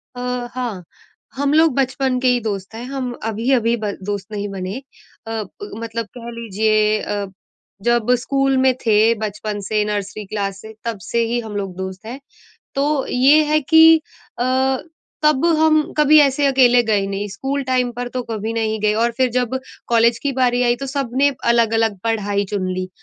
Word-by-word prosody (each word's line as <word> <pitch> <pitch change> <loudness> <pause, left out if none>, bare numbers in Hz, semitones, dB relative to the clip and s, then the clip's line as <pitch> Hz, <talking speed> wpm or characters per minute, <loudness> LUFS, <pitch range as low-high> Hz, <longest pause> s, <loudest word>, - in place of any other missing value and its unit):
अ, 250 0 -3
हाँ। 240 -7 -4 0.5
हम 285 +1 0
लोग 320 -1 +4
बचपन 260 -1 0
के 255 - +1
ही 250 -1 +3
दोस्त 200 -2 -4
हैं, 230 - -6
हम 260 -1 -4
अभी-अभी 230 +2 +1
ब 210 -2 -3
दोस्त 200 -1 -4
नहीं 205 -1 -3
बने। 190 +2 -5 0.5
अ 225 - -5
ब 410 - -11
मतलब 230 0 -4
कह 235 -1 -8
लीजिए 215 -1 +1
अ, 205 -1 -3 0.6
जब 240 +1 +2
स्कूल 270 +1 +1
में 260 0 +4
थे 220 +1 +4
बचपन 210 -1 -4
से 215 0 +1
नर्सरी 205 0 -4
क्लास 195 -1 -4
से 220 0 -11
तब 230 -2 -2
से 235 - -2
ही 235 +1 -1
हम 220 -3 -7
लोग 195 -3 -4
दोस्त 190 +2 -6
हैं। 245 +4 -7 0.6
तो 280 0 0
ये 275 +5 +5
है 305 +1 +2
कि 320 +2 +6 0.4
अ, - - 0 0.8
तब 300 -1 +3
हम 310 -1 +3
कभी 300 +1 +6
ऐसे 280 0 +3
अकेले 250 -3 +5
गए 210 -4 +1
नहीं 200 +1 -3
स्कूल 275 +7 -3
टाइम 255 -1 +1
पर 245 +1 -5
तो 250 +1 -4
कभी 220 0 -3
नहीं 220 -1 -1
गए। 210 0 +2
और 235 - +2
फिर 255 -1 +2
जब 250 +1 -1 0.3
कॉलेज 235 0 +3
की 285 - -2
बारी 250 -1 +1
आई, 240 0 +2
तो 275 - -6
सब 270 -2 -3
ने 285 - +5 0.2
अलग-अलग 225 -3 +2
पढ़ाई 205 -3 0
चुन 190 -3 -2
ली। 185 0 -4
235 Hz, 180 wpm, -19 LUFS, 210-260 Hz, 0.8 s, कि